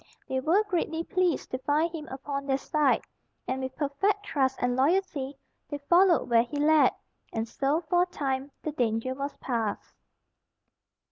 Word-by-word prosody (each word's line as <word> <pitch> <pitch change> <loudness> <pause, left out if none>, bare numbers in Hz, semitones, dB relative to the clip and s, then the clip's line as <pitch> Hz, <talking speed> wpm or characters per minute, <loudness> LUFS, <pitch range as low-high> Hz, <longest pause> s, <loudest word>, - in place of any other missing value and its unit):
They 260 - -1
were 335 +10 +3
greatly 330 -4 -1
pleased 360 -3 0
to 255 - -2
find 305 +5 +1
him 310 -3 -6
upon 275 +1 -5
their 270 -1 +2
side, 290 0 +1 0.4
and, 260 +1 -2
with 260 0 -4
perfect 390 +9 0
trust 265 -8 +1
and 245 0 +1
loyalty, 285 -2 +1 0.3
they 290 - -3
followed 345 +4 +4
where 235 -1 +5
he 245 +5 -5
led; 305 +1 +5 0.4
and 225 0 -2
so 280 +7 0
for 350 +2 +2
a 360 - +2
time 275 -5 -2
the 310 - -2
danger 240 -2 0
was 280 +2 -5
past. 230 -5 -3
285 Hz, 160 wpm, -28 LUFS, 260-330 Hz, 0.4 s, where